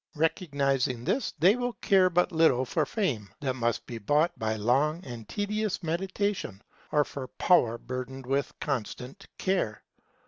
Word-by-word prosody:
Recognizing 140 -6 0
this, 250 - 0
they 180 +8 +5
will 245 -1 -2
care 190 -4 +4
but 180 0 +2
little 160 -6 +4
for 155 +4 0
fame 130 - -1
that 135 -3 -1
must 120 -2 -1
be 115 -2 -6
bought 150 - +2
by 110 0 0
long 140 - +1
and 120 -4 -8
tedious 210 -1 -2
meditation, 185 - -2 0.3
or 150 -1 +3
for 135 -2 -6
power 120 -7 +3
burdened 130 +2 -6
with 135 +2 0
constant 130 - -4
care. 185 - -1
145 Hz, 145 wpm, -28 LUFS, 125-185 Hz, 0.3 s, they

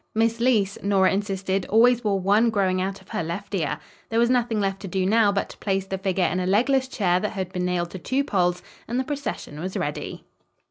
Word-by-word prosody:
Miss 230 +1 +2
Leece, 220 -5 +2
Nora 195 -2 +3
insisted, 195 -1 -1
always 240 +2 +4
wore 200 -2 +1
one 205 +5 +3
growing 190 -4 +1
out 195 +1 -3
of 190 - -21
her - - -2
left 185 +6 -5
ear. 165 -7 -1 0.3
There 225 - -1
was 235 +1 +4
nothing 240 -3 +1
left 195 -1 -1
to 195 - -7
do 185 +1 -1
now, 210 +1 +4
but 200 0 -1
to - - -12
place 195 -1 -1
the 190 0 -4
figure 190 -1 +1
in 180 - 0
a 180 - -1
legless 260 +7 +2
chair 185 -8 +1
that 210 +3 -3
had 190 -2 -4
been 180 -1 -1
nailed 175 -1 -1
to 190 - -7
two 265 +8 0
poles, 180 -7 0 0.2
and 240 +2 -1
the - - +1
procession 275 - -5
was 185 +3 -4
ready. 145 - -4
195 Hz, 230 wpm, -24 LUFS, 185-225 Hz, 0.3 s, always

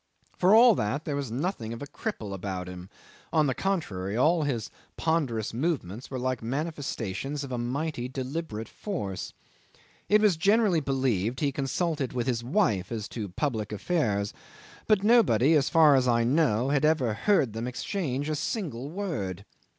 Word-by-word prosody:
For 190 +4 +5
all 235 +1 +8
that, 140 - -2
there 150 - -2
was 140 -3 -3
nothing 120 - -3
of 115 - -8
a - - -4
cripple 145 - -5
about 95 -1 -4
him: 90 0 -9 0.4
on 155 -2 +3
the 135 - +1
contrary, 110 - -2
all 160 +6 +4
his 130 -7 -2 0.3
ponderous 135 -11 0
movements 125 - -2
were 130 - -4
like 130 -1 -2
manifestations 140 - -3
of 135 - -7
a 125 - -2
mighty 125 +1 -2
deliberate 130 -3 -4
force. 105 - -5 0.8
It 210 - +6
was 210 -6 +3
generally 200 0 +3
believed 130 -5 0
he 145 -2 +1
consulted 140 +1 -1
his 120 -1 -1
wife 120 - +1
as 110 -2 -3
to 105 -4 -5
public 110 0 -2
affairs; 105 - 0 0.5
but 210 -3 +3
nobody, 165 - +5
as 145 -3 +3
far 155 -3 +6
as 130 -2 +3
I 115 -1 +3
know, 130 -2 +2
had 145 0 +1
ever 150 -7 +2
heard 135 - +2
them 115 +2 -3
exchange 140 - -3
a 155 - -1
single 145 - -3
word. 140 - -4
135 Hz, 160 wpm, -28 LUFS, 115-160 Hz, 0.8 s, all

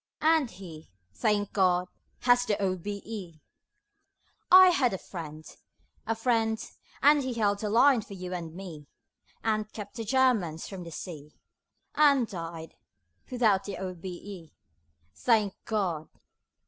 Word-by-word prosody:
And 315 -4 +4
he 165 -6 -11 0.2
thank 205 - 0
God! 180 -2 +2 0.3
has 245 0 +4
the 205 - 0
O.B.E. 195 -2 -4 1.1
I 370 0 +10
had 265 - +2
a - - -4
friend; 155 -4 -8 0.6
a 225 - 0
friend, 225 -1 +1 0.5
and 290 0 +6
he 260 - -4
Just 240 - -4
held 205 -2 +1
the 210 - -2
line 245 +3 +5
for 205 -1 -10
you 185 -1 -6
and 170 -3 -5
me, 165 -6 -9 0.6
And 215 -1 -1
kept 205 +1 -9
the 225 - -3
Germans 220 -10 +1
from 185 -3 -8
the 170 - -9
sea, 155 -3 -8 0.6
And 280 -5 +4
died 165 -4 -7 0.6
without 225 -7 +2
the 200 - -5
O.B.E. 185 -1 -7 0.6
Thank 215 -5 +2
God! 180 -8 -2
200 Hz, 135 wpm, -28 LUFS, 175-230 Hz, 1.1 s, I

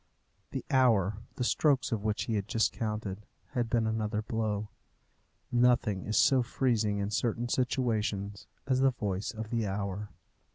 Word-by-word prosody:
The - - -5
hour, 110 -7 +4 0.2
the 125 - -2
strokes 140 +1 +2
of 110 -3 -1
which 105 0 0
he 115 - -2
had 100 -2 -1
just 115 0 +2
counted, 105 -3 -3 0.3
had 120 -2 -1
been 115 -1 +2
another 110 -1 -1
blow. 110 -2 -2 0.8
Nothing 120 -5 +3
is 105 - 0
so 135 -2 +5
freezing 115 -4 +1
in 100 +1 -2
certain 120 +2 0
situations 110 -6 -1 0.2
as 130 -1 +2
the 135 0 +5
voice 105 -5 -3
of 110 -1 -7
the 115 -3 0
hour. 100 +1 -3
110 Hz, 155 wpm, -30 LUFS, 105-120 Hz, 0.8 s, so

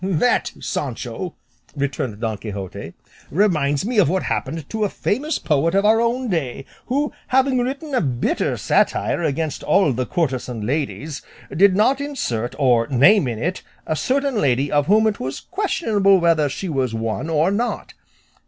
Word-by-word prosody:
"That, 190 +6 +1
Sancho," - - -4 0.4
returned 140 -6 -3
Don 110 -2 -1
Quixote, 100 -4 -7 0.3
"reminds 155 -5 +1
me 235 -1 +1
of 180 - +4
what 185 +2 0
happened 145 +2 -3
to 220 -1 -1
a 205 - +1
famous 290 +13 -1
poet 160 +3 +1
of 200 +1 +3
our 220 +2 +5
own 245 +2 0
day, 140 - -2 0.2
who, 285 +3 0
having 265 0 +2
written 275 +4 -3
a 255 - +2
bitter 125 -5 -1
satire - - +1
against 155 -1 -2
all 190 -9 +3
the 125 +1 -2
courtesan 130 - -2
ladies, 145 +2 -3 0.3
did 195 +2 +5
not 260 +7 +3
insert 120 - -3
or 120 -5 +3
name 145 - +5
in 115 -2 -3
it 175 +11 -2 0.2
a 155 - -1
certain 260 - 0
lady 135 0 +1
of 145 -1 +2
whom 215 +2 +4
it 215 -2 0
was 130 +2 -4
questionable 225 - +1
whether 165 -4 +3
she 190 +7 -5
was 130 -7 -1
one 115 +7 -3
or 160 +3 +2
not. 235 +4 -2
165 Hz, 160 wpm, -21 LUFS, 135-220 Hz, 0.4 s, our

